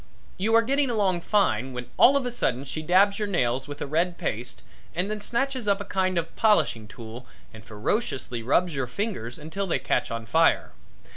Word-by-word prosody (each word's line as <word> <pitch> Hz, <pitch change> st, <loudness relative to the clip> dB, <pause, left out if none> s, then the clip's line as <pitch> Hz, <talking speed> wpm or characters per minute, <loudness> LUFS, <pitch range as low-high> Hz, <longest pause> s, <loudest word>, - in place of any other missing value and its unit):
You 220 Hz, +4 st, +2 dB
are 230 Hz, -, +6 dB
getting 275 Hz, +3 st, +1 dB
along 195 Hz, -6 st, +1 dB
fine, 135 Hz, -, +1 dB
when 125 Hz, 0 st, -5 dB
all 275 Hz, +3 st, +6 dB
of 270 Hz, -, -2 dB
a 245 Hz, -, -2 dB
sudden 135 Hz, -, -1 dB
she 155 Hz, -, -5 dB
dabs 195 Hz, +6 st, +3 dB
your 210 Hz, -, -1 dB
nails 130 Hz, -8 st, 0 dB
with 145 Hz, 0 st, -6 dB
a -, -, -3 dB
red 170 Hz, +5 st, 0 dB
paste 120 Hz, +3 st, -4 dB, 0.3 s
and 180 Hz, +5 st, 0 dB
then 215 Hz, -1 st, -4 dB
snatches 255 Hz, +1 st, -1 dB
up 200 Hz, 0 st, +3 dB
a 205 Hz, -, -5 dB
kind 185 Hz, -1 st, 0 dB
of 165 Hz, -, +1 dB
a 165 Hz, -, -24 dB
polishing 205 Hz, -, +2 dB
tool 115 Hz, +2 st, -10 dB, 0.3 s
and 110 Hz, 0 st, -12 dB
ferociously 120 Hz, -, -2 dB
rubs 165 Hz, +9 st, +2 dB
your 135 Hz, -3 st, -2 dB
fingers 125 Hz, -, -4 dB
until 175 Hz, +6 st, -4 dB
they 170 Hz, -, +1 dB
catch 135 Hz, -, -1 dB
on 115 Hz, 0 st, -4 dB
fire. 160 Hz, +8 st, +3 dB
175 Hz, 205 wpm, -26 LUFS, 125-210 Hz, 0.3 s, are